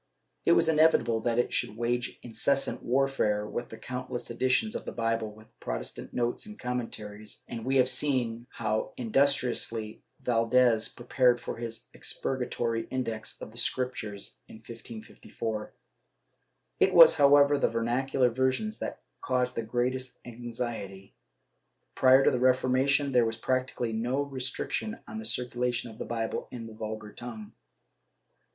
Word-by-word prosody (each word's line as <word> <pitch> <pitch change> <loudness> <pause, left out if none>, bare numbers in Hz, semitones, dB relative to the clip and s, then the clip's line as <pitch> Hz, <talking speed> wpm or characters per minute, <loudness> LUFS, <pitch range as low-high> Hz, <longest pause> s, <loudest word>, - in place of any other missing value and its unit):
It - - +6
was - - +4
inevitable 155 -8 +4
that 115 +1 0
it 120 - +1
should 110 - -1
wage 120 +1 -1
incessant 130 +4 0
warfare 125 -5 +1
with 120 +2 -4
the 110 - -9
countless 125 +1 -5
editions 130 - +1
of - - -3
the - - -5
Bible 115 -2 -1
with 110 +1 -15
Protestant - - -5
notes 120 - -1
and 215 0 -9
commentaries, 110 -4 -5
and 115 -2 -6
we 135 +2 0
have 130 -1 +5
seen 125 -4 0
how 110 -1 -2
indus 135 +4 +4
triously 115 -4 -2 0.2
Valdes 115 -1 +3
prepared 125 0 +2
for - - -5
his 115 -1 -6
expurgatory 120 -3 -2
Index 115 -4 -3
of - - -8
the 120 - -3
Scrip 125 +1 0
tures 105 -4 -6
in - - -12
1554. 110 -1 -7 1.1
It - - +4
was, 165 -2 +10
however, 145 -1 +6
the - - +3
vernacular 125 +3 +1
versions 130 - 0
that - - -5 0.2
caused 125 -1 0
the 115 - -2
greatest 125 +3 -2
anxiety. 115 -5 -6 0.8
Prior 130 +1 +6
to - - +5
the 125 - 0
Reformation 130 +2 +3
there 125 -2 +4
was 115 0 -3
practically 130 -1 -1
no 125 +5 0
restriction 140 - -3
on 220 - -6
the 225 - -7
circulation 125 - -2
of 110 - -14
the - - -4
Bible 115 -1 -3
in 120 -2 -7
the 110 - -9
vulgar 110 -1 -6
tongue. 110 -3 -7
120 Hz, 145 wpm, -29 LUFS, 115-130 Hz, 1.1 s, was